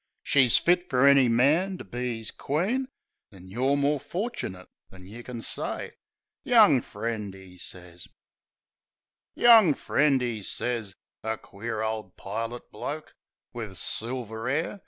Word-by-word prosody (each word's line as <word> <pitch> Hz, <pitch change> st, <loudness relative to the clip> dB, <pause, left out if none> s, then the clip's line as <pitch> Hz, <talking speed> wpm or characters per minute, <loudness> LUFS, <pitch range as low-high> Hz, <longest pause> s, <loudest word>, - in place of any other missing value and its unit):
She's 130 Hz, -4 st, +4 dB
fit 175 Hz, +1 st, +2 dB
fer 125 Hz, +1 st, +3 dB
any 140 Hz, -3 st, +6 dB
man, 155 Hz, +11 st, +3 dB
to -, -, -8 dB
be 120 Hz, +2 st, -4 dB
'is 110 Hz, -, -5 dB
queen; 205 Hz, -, -1 dB, 0.4 s
An' 95 Hz, -2 st, -14 dB
you're 130 Hz, +7 st, +1 dB
more 145 Hz, +1 st, +1 dB
forchinit 145 Hz, -, -5 dB, 0.2 s
than 90 Hz, -1 st, -14 dB
you 110 Hz, +5 st, -10 dB
kin 120 Hz, -2 st, -7 dB
say, -, -, -4 dB, 0.5 s
"Young 220 Hz, -, +6 dB
friend," 105 Hz, -3 st, -5 dB
'e 95 Hz, -1 st, -14 dB
sez. 90 Hz, -1 st, -8 dB, 1.3 s
"Young 220 Hz, -10 st, +7 dB
friend," 140 Hz, -3 st, +2 dB
'e 115 Hz, -3 st, -3 dB
sez... 110 Hz, -1 st, -3 dB, 0.3 s
A 110 Hz, 0 st, -2 dB
queer 110 Hz, +2 st, -5 dB
ole 110 Hz, -3 st, -3 dB
pilot 115 Hz, +4 st, -5 dB
bloke, 155 Hz, +2 st, -6 dB, 0.4 s
Wiv 110 Hz, -6 st, -6 dB
silver 115 Hz, -1 st, 0 dB
'air. 160 Hz, +8 st, -1 dB
120 Hz, 135 wpm, -27 LUFS, 110-145 Hz, 1.3 s, Young